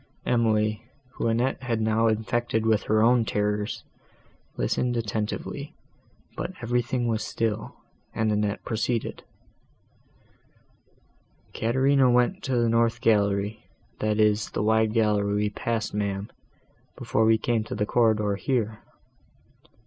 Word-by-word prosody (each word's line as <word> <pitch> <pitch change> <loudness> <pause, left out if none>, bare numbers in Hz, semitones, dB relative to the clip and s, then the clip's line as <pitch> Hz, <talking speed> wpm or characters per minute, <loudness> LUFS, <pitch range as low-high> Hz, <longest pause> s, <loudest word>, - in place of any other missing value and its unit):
Emily, 110 -3 +1 0.3
whom 115 - -3
Annette 120 +4 0
had 120 -4 -1
now 110 +1 +2
infected 110 +1 0
with 110 -1 +3
her 110 0 +3
own 120 0 +4
terrors, 105 -1 -2 0.7
listened 120 - 0
attentively; 110 -1 -4 0.6
but 185 - -4
everything 120 +1 0
was 115 -1 0
still, 110 -2 -3 0.4
and 110 -1 0
Annette 105 0 -1
proceeded: 115 +1 -2 2.3
"Caterina 130 +3 +3
went 125 +10 +2
to 130 -2 0
the 120 -1 +2
north 115 0 +2
gallery, 105 -2 +1 0.4
that 105 0 0
is 105 -1 +2
the - - -2
wide 110 0 +3
gallery 105 -3 +2
we 105 0 +1
passed, 115 +1 -2
ma'am, 100 -1 -2 0.7
before 110 - 0
we 110 0 +5
came 115 -1 0
to - - -5
the 105 0 0
corridor, 105 -3 +2
here. 110 -1 -1
110 Hz, 120 wpm, -26 LUFS, 105-120 Hz, 2.3 s, we